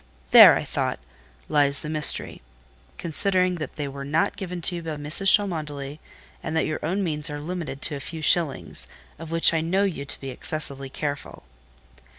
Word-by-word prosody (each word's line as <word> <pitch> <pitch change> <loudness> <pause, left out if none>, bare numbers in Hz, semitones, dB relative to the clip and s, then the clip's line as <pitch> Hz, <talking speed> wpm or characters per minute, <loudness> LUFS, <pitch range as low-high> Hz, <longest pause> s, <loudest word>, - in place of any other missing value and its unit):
"There," - - +10
I - - -2
thought, - - -2 0.5
"lies 140 -2 +2
the - - -7
mystery; 155 -1 +2 0.6
considering 185 +2 +1
that 150 -4 -6
they 145 -2 -4
were 140 0 -7
not 150 +4 0
given 180 -3 -6
you 175 -2 -1
by 160 -2 -5
Mrs. 150 +7 0
Cholmondeley, 150 -7 -6 0.4
and 160 -1 -5
that - - +1
your 155 - -4
own 185 +6 -1
means 150 -3 -3
are 145 0 -5
limited 155 -3 -6
to 150 - -1
a - - -6
few 160 +3 -7
shillings, 145 - 0 0.3
of 165 -1 -9
which 165 0 +4
I 160 - +1
know 185 +5 0
you 175 -8 -2
to 140 - -6
be 135 -1 -6
excessively 140 0 -3
careful." 145 +1 -5
155 Hz, 175 wpm, -24 LUFS, 145-170 Hz, 0.6 s, There